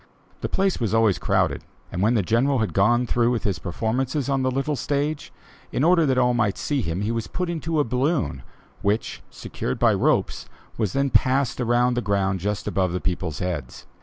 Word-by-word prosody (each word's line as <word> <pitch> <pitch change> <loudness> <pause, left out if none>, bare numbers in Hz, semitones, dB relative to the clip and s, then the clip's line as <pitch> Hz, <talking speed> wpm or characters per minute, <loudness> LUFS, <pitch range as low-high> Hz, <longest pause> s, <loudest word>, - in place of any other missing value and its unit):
The - - -3
place 195 -1 0
was 115 -2 0
always 110 -4 +3
crowded, - - 0 0.3
and 90 - -3
when 110 +4 +3
the 105 - +2
General 125 +8 +2
had 110 -3 -1
gone 120 +5 +3
through 120 0 +2
with 120 -2 -1
his 95 -4 -1
performances 125 - -2
on 135 -1 +1
the 130 - +1
little 135 +3 -1
stage, 145 +2 -2 0.4
in 130 - 0
order 165 -1 +4
that 130 -1 +1
all 125 -1 +3
might 110 -5 +1
see 145 -3 -1
him 85 -1 -3
he 105 +2 -1
was 115 -1 -3
put 180 -2 -3
into 165 -1 -2
a - - +4
balloon 125 - -1 0.4
which, 105 +3 -1
secured - - -5
by - - +4
ropes, - - 0 0.3
was 105 -5 -1
then 140 0 +1
passed 130 -1 +2
around 120 +1 +2
the 120 - -1
ground 100 -2 0
just 105 +2 -3
above 95 -2 0
the 90 - -1
people's 85 -4 -3
heads. 80 -9 -4
120 Hz, 200 wpm, -24 LUFS, 100-135 Hz, 0.4 s, order